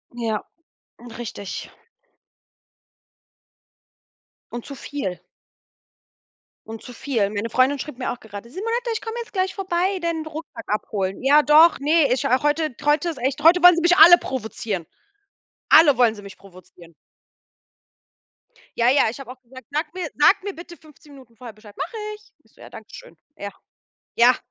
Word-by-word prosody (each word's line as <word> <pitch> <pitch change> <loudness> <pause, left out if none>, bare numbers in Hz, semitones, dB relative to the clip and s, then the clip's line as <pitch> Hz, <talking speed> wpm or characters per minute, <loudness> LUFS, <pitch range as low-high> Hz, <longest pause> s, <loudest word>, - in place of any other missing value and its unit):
Ja, 225 -3 -3 0.8
richtig. 225 -4 -7 2.8
Und 240 -1 -7
zu 280 - -9
viel. 240 -9 -6 1.5
Und 225 0 -8
zu - - -10
viel. 235 -4 -2
Meine 210 +2 -4
Freundin 260 +4 +2
schrieb 280 -1 -7
mir 250 - -3
auch 245 - -7
gerade: 215 +1 -11
„Simonette, 460 - -3
ich 445 - -3
komm 450 +1 -6
jetzt 460 - -11
gleich 375 -2 -2
vorbei, 380 0 -1
den 330 -2 -2
Rucksack 315 +1 -9
abholen. 200 -1 -3
Ja, 290 +3 +5
doch, 310 +3 +5
ne 295 -1 +2
ich, 250 - 0
ach 255 +2 +1
heute 295 -2 0
heute 295 +3 +1
ist 325 - -6
echt 265 +4 -2
heute 335 +3 +5
wollen 355 -1 +9
sie 340 - -1
mich 350 +1 +4
alle 345 +2 +9
provozieren. 220 - -5 0.9
Alle 300 -4 +7
wollen 235 -3 +4
sie 205 - -12
mich 200 -1 -12
provozieren.“ 180 -3 -17 1.9
Ja, 235 +1 +4
ja, 265 -3 +3
ich 235 - -9
habe 260 -2 -9
auch 255 0 -14
gesagt: 260 +1 -15
„Sag 300 +1 -3
mir 365 -4 -4
sag 380 +6 +4
mir 405 0 -5
bitte 345 0 -12
15 300 -1 -20
Minuten 255 -4 -17
vorher 240 +1 -10
Bescheid.“ 215 -1 -17
„Mache 395 +8 -5 0.2
ich.“ 430 +2 -22
Ich - - -30
so: - - -21
„Ja, - - -12
danke - - -13
schön.“ - - -13 0.2
Ja. 200 - -7 0.7
Ja, 245 +2 +5
280 Hz, 165 wpm, -22 LUFS, 230-335 Hz, 2.8 s, wollen